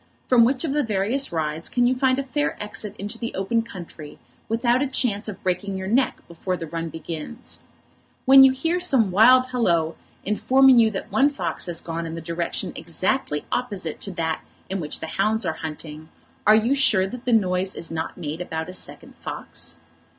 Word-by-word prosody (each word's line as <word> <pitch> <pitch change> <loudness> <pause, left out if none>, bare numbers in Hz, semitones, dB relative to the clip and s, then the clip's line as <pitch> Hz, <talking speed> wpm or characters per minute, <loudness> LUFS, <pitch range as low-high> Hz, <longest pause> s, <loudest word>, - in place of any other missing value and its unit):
From 245 -2 +5
which 255 +1 +1
of 280 - -1
the 295 - +2
various 225 +4 0
rides 160 -1 -2
can 245 -1 +2
you 250 - +4
find 260 0 +2
a 275 - -1
fair 290 +2 -1
exit 210 0 -3
into 205 +4 -5
the 230 - -4
open 195 +5 +1
country, 175 -8 -10 0.3
without 240 +3 +2
a 285 - +1
chance 230 -5 0
of 200 -1 -9
breaking 190 +2 -1
your 190 - -5
neck 250 +6 +1
before 180 +2 -3
the 165 - -5
run 165 +1 -4
begins? 165 - -7 0.6
When 270 +1 +9
you 265 - +7
hear 325 +7 -1
some 265 - +3
wild 255 +6 +6
halloa, 170 -10 +1 0.3
informing 260 +5 +5
you 225 -1 +5
that 195 -3 -6
one 275 +2 +4
fox 180 - -3
has 170 -1 -2
gone 165 0 -4
in 165 - -6
the - - -5
direction 170 +1 -3
exactly 170 - -1
opposite 200 -10 -3
to 200 - -4
that 160 -2 -2 0.3
in 195 - -1
which 150 -3 -3
the - - -3
hounds 215 +6 0
are - - 0
hunting, 155 0 -7 0.4
are 215 - +8
you 225 +5 +3
sure 225 -9 +3
that 240 +5 -7
the 250 - +1
noise 185 -3 +2
is 165 - -4
not 160 0 -4
made 160 -1 -5
about 160 -1 -4
a - - -7
second - - -5
fox? 80 - -6
200 Hz, 195 wpm, -23 LUFS, 170-250 Hz, 0.6 s, When